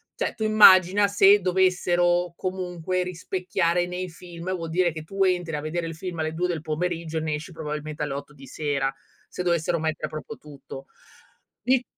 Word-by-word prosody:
Cioè - - -2
tu 220 - -4
immagina 205 -2 +7
se 200 0 +6
dovessero 180 -1 +2
comunque 185 -1 -3
rispecchiare 180 -1 -1
nei 180 +1 -4
film, 170 +2 -7
vuol 165 -2 -5
dire 175 +1 +2
che 160 -1 -7
tu 195 +4 -1
entri 175 -3 0
a 150 - -3
vedere 165 +2 -3
il 165 - -6
film 170 0 -6
alle 155 0 -1
2 180 +2 0
del 165 -4 -3
pomeriggio 165 0 -3
e - - -1
ne 155 -1 -2
esci 155 +5 -8
probabilmente 150 -1 -5
alle 145 -2 -3
8 140 +2 -7
di 135 - -13
sera 135 -1 -2 0.3
se - - -6
dovessero 170 -1 0
mettere 155 0 -2
proprio 155 - -7
tutto. 140 -2 -11 0.8
I 255 0 +3
175 Hz, 180 wpm, -25 LUFS, 155-185 Hz, 0.8 s, immagina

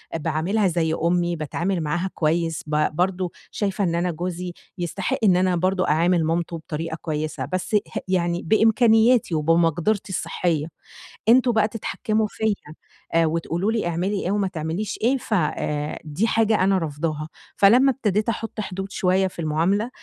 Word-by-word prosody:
باعاملها 165 +6 0
زي 160 -2 0
أُمّي 175 +1 +1
باتعامل 170 +4 -2
معاها 175 +5 -1
كويس 165 0 0
ب 150 0 0
برضو 180 0 0 0.2
شايفة 200 -1 -1
إن 170 -2 0
أنا 175 +1 0
جوزي 175 +1 -4 0.2
يستحق 175 +2 -2
إن 190 -4 +5
أنا 185 0 +2
برضو 185 +2 +1
أعامل 165 +2 +2
مامته 165 +1 -1
بطريقة 160 +1 -5
كويسة، 155 -1 -3
بس 185 +4 -1
ه 205 - -1
يعني 175 -2 0
بإمكانياتي 225 0 +4
وبمقدرتي 165 +6 +1
الصحية. 165 -4 -1 0.6
"أنتم 245 0 +5
بقى 215 -1 +3
تتحكموا 220 0 -2
فيَّ 220 -1 0 0.6
آآ 165 0 +4
وتقولوا 170 +5 -1
لي 220 -6 -1
اعملي 185 +4 -1
إيه 185 - 0
وما 205 -1 +1
تعمليش 170 +3 -4
إيه 260 +4 +3
ف 230 - -5
آآ 150 -4 -1
دي 155 +10 -1
حاجة 220 -3 +2
أنا 195 0 +3
رافضاها"، 155 -1 -3 0.3
فلمّا 245 +7 +6
ابتديت 215 -4 0
أحُط 225 -1 -4
حدود 195 0 -5
شوية 190 +1 +2
في 180 - -11
المعاملة 170 +9 +1
180 Hz, 155 wpm, -23 LUFS, 165-205 Hz, 0.6 s, فلمّا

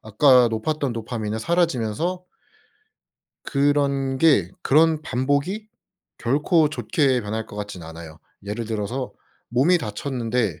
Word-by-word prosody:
아까 125 +3 +5
높았던 135 +4 -2
도파민은 110 -1 -4
사라지면서 170 - 0 1.2
그런게 140 - +2
그런 155 +2 +3
반복이 145 - -1 0.5
결코 150 +5 +2
좋게 145 -4 +1
변할 110 +2 -4
것 105 - -11
같지는 100 -5 -6
않아요. 80 -1 -10 0.3
예를 105 +3 -4
들어서 115 +4 -3 0.4
몸이 140 +10 +3
다쳤는데 115 - -2
130 Hz, 260 characters per minute, -23 LUFS, 110-150 Hz, 1.2 s, 아까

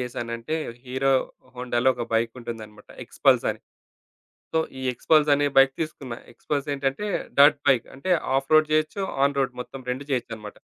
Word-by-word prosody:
జేశానంటే, 120 +2 -4 0.3
హీరో 135 +2 +1 0.4
హోండాలో 125 0 0
ఒక 120 -1 -4
బైకు 115 0 +1
ఉంటుందన్నమాట 110 -3 -9 0.2
ఎక్స్‌పల్సని. - - +2 0.9
సో, 160 - +3 0.2
ఈ - - -7
ఎక్స్‌పల్సనే 145 +1 +3
బైకు. 135 0 +6 0.6
ఎక్స్‌పల్స్ 145 +3 -3
ఏంటంటే 135 +8 -2 0.3
డర్ట్ 145 0 +7
బైక్ 130 -4 +3
అంటే 180 +8 -3 0.3
ఆఫ్ 135 - -3
రోడ్ 155 0 +5
జేయొచ్చు, 155 +5 0 0.2
ఆన్ 140 0 0
రోడ్ 130 -2 0
మొత్తం 135 +2 -9
2 135 +3 -5
జేయొచ్చన్నమాట. 115 -4 -4
135 Hz, 135 wpm, -25 LUFS, 120-145 Hz, 0.9 s, డర్ట్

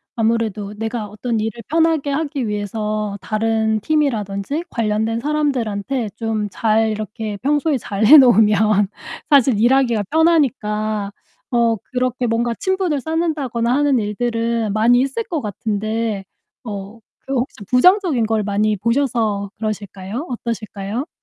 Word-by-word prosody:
아무래도 220 -3 -1
내가 225 0 -4
어떤 220 +2 -3
일을 220 +2 -3
편하게 320 -3 +2
하기 280 -4 -2
위해서 210 0 -3
다른 220 0 0
팀이라든지 275 - -1
관련된 220 0 -1
사람들한테 255 -5 -1
좀 220 -2 -2
잘 220 +1 +2
이렇게 215 0 -4
평소에 290 +3 +1
잘 210 -2 -2
해 300 +7 +10
놓으면 215 -4 +5 0.4
사실 260 -6 +5
일하기가 240 -3 +3
편하니까 215 -11 +1 0.4
어 235 -2 +2 0.2
그렇게 250 -1 -1
뭔가 235 +1 0
친분을 375 -7 0
쌓는다거나 285 -7 -1
하는 285 -1 +3
일들은 230 0 -1
많이 240 +3 +4
있을 275 +12 -1
것 340 -9 -3
같은데 215 0 -2 0.4
어 205 -1 -7 0.3
그 - - -1
혹시 255 +1 -2
부정적인 320 - +4
걸 220 0 0
많이 210 +1 0
보셔서 225 -3 0
그러실까요? 210 - -5
어떠실까요? 230 - -4
225 Hz, 305 characters per minute, -19 LUFS, 210-270 Hz, 0.4 s, 해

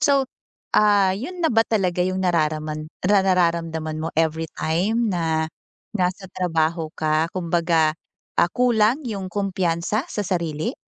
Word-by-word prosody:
So, 275 -2 +3 0.5
ah, 205 -3 +5
yun 350 - -6
na 325 - +3
ba 225 0 +3
talaga 185 -6 +1
yung 185 0 -1
nararaman 155 -3 0
ra 200 +1 +3
nararamdaman 165 -4 +1
mo, 160 - -2
everytime 165 +7 0
na 160 -4 0 0.5
nasa 185 0 -1
trabaho 165 -3 -1
ka. 155 +1 0
Kumbaga, 170 -3 +1 0.4
ah, 170 - +3
kulang 240 +1 +3
yung 195 -4 -4
kumpiyansa 190 - -1
sa 210 - -2
sarili? 170 - -2
180 Hz, 125 wpm, -23 LUFS, 160-205 Hz, 0.5 s, ah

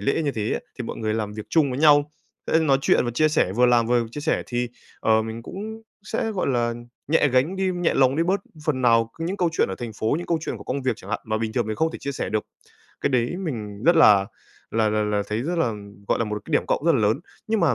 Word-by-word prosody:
lễ 140 +4 0
như 145 -3 0
thế 110 -1 -2
á - - 0 0.2
thì 120 - -3
mọi - - -5
người 110 -1 -1
làm 105 -2 -2
việc 110 0 -7
chung 150 -5 +3
với 125 - -3
nhau, 145 -1 +5 0.4
sẽ 160 - +3
nói 140 -4 +3
chuyện - - +3
và 120 - -1
chia 155 +6 +2
sẻ, 150 - +1
vừa 125 +4 +4
làm 120 -2 +4
vừa 120 -1 +2
chia 150 - -6
sẻ 160 +2 0
thì, 120 0 -2 0.3
ờ, 110 0 +3
mình 110 +1 -6
cũng 220 - -7 0.2
sẽ, 225 +1 -2
gọi 195 - -2
là, 120 -3 +1 0.3
nhẹ 150 -2 +4
gánh 135 +9 +1
đi, 190 -1 +1
nhẹ 175 -1 0
lòng 135 +1 +3
đi 165 - +3
bớt 190 +3 +1 0.2
phần 130 -5 0
nào 115 -1 +4
những 175 +4 -2
câu 175 -3 +2
chuyện - - +1
ở 95 - -3
thành 115 -2 -5
phố, 110 +5 +1
những 175 - -6
câu 165 -2 +1
chuyện 130 - -4
của 100 - -11
công 135 +1 -3
việc 130 -1 +1
chẳng 100 -3 -11
hạn 105 - -1
mà 110 0 -1
bình 110 -1 -2
thường 120 -2 0
mình 110 0 -3
không 160 0 +1
thể - - -6
chia 140 - -4
sẻ - - -3
được. 110 -1 -1 0.6
Cái 140 - 0
đấy 125 +6 +1
mình 110 - -5
rất 170 0 +5
là 100 -10 +6 0.4
là 110 -1 +2
là 105 0 +1
là 105 -1 0
thấy 110 +3 -2
rất 170 +4 -2
là 120 -9 +1 0.4
gọi - - +2
là 115 - +1
một 105 0 -3
cái - - -8
điểm - - +2
cộng 150 - 0
rất 165 - +5
là 135 - +2
lớn. 110 +6 +2 0.3
Nhưng 220 -1 +1
mà 150 -8 +3
125 Hz, 285 wpm, -24 LUFS, 110-160 Hz, 0.6 s, là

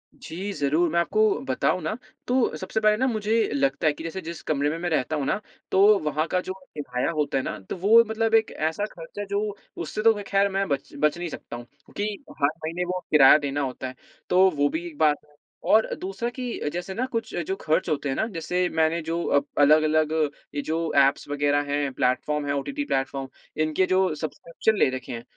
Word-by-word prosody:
जी, 190 +5 -6
ज़रूर, 155 +3 +1
मैं 170 - +2
आपको 430 - +1 0.3
बताऊँ - - +1
ना, - - -3 0.3
तो 250 0 +2
सबसे 220 - -2
पहले 215 -1 +3
ना, 260 +3 +1
मुझे 220 -2 0 0.2
लगता 140 +3 +1
है 150 - +3
कि 160 - -9
जैसे, 165 +3 -5
जिस 165 -1 -7
कमरे 145 -1 0
में 160 - -3
मैं 175 +1 -2
रहता 155 -1 0
हूँ 145 - -1
ना, 195 - 0 0.3
तो 200 +2 +6
वहाँ 155 +1 0
का 180 +1 0
जो 185 - -5 0.2
किराया 125 -1 -2
होता 150 -4 0
है 130 - 0
ना, - - -4
तो - - -2
वो 220 +6 +6
मतलब 225 0 0
एक 225 -1 +3
ऐसा 160 +6 -1
खर्च 165 +4 -10
है, 205 - -2
जो 200 0 -1 0.4
उससे 170 +6 -4
तो 225 - +7
मैं, 205 - -5
ख़ैर, 200 0 +3
मैं 195 0 -1
बच 140 -1 -2
बच 150 +2 +2
नहीं 175 0 -4
सकता 130 - -8
हूँ, 120 0 -8 0.2
क्योंकि 210 +1 -3 0.3
हर 140 - +5 0.2
महीने 170 +3 -2
वो 180 +1 -2
किराया 150 -1 +8
देना 145 -1 -2
होता 130 -1 -4
है। 130 - -8 0.3
तो 185 +1 +6
वो 145 0 +3
भी 160 +3 -4
एक 160 -4 -11
बात 150 -1 +4
है 150 - -26 0.4
और 220 +1 +4
दूसरा 195 +6 -3
कि 245 -11 -3
जैसे 175 +2 -4
ना, 245 +6 -1
कुछ 230 -3 -4
जो 190 - -1
खर्च 155 - +1
होते 145 -2 -1
हैं 135 - -1
ना, - - 0
जैसे 180 -1 -1
मैंने 160 +1 +2
जो 165 +2 -2
अब 140 - +1 0.2
अलग-अलग 155 +1 +4 0.4
ये 145 - 0
जो 165 0 -1 0.2
ऐप्स 140 - -3
वगैरह 145 0 +1
हैं, 145 -1 0
प्लेटफ़ॉर्म 145 +4 0
हैं, 140 - -1
ओटीटी 275 - -2
प्लेटफ़ॉर्म, 135 - -2 0.3
इनके 155 +4 +2
जो 185 -2 +2
सब्सक्रिप्शन 170 +7 -2
ले - - +5
रखे 130 - -10
हैं, 115 0 -6
160 Hz, 220 wpm, -25 LUFS, 145-195 Hz, 0.4 s, किराया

